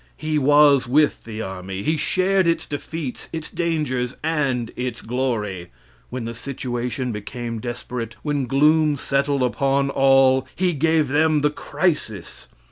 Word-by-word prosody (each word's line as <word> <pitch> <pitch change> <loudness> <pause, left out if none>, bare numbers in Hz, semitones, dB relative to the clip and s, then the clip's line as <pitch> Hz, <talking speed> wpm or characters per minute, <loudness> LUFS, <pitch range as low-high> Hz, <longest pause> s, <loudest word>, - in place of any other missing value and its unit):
He 155 -1 -1
was 145 -2 +5
with 150 +4 +2
the 110 -1 -5
army. 95 0 -6
He 155 - +1
shared 185 +4 +2
its 170 - +1
defeats, 145 -2 -6
its 160 -2 -5
dangers, 150 -7 -1
and 140 -7 0
its 125 -1 -3
glory. 110 -8 -2 0.4
When 125 -2 -5
the 115 - -4
situation 125 0 -4
became 115 +2 -5
desperate, 120 -1 -5
when 145 -4 -1
gloom 150 +3 +3
settled 140 0 0
upon 140 +2 +1
all, 135 -1 +4
he 180 -1 +1
gave 155 -1 +2
them 155 +1 +3
the 150 0 +2
"Crisis." 150 - -3
135 Hz, 135 wpm, -22 LUFS, 120-150 Hz, 0.4 s, was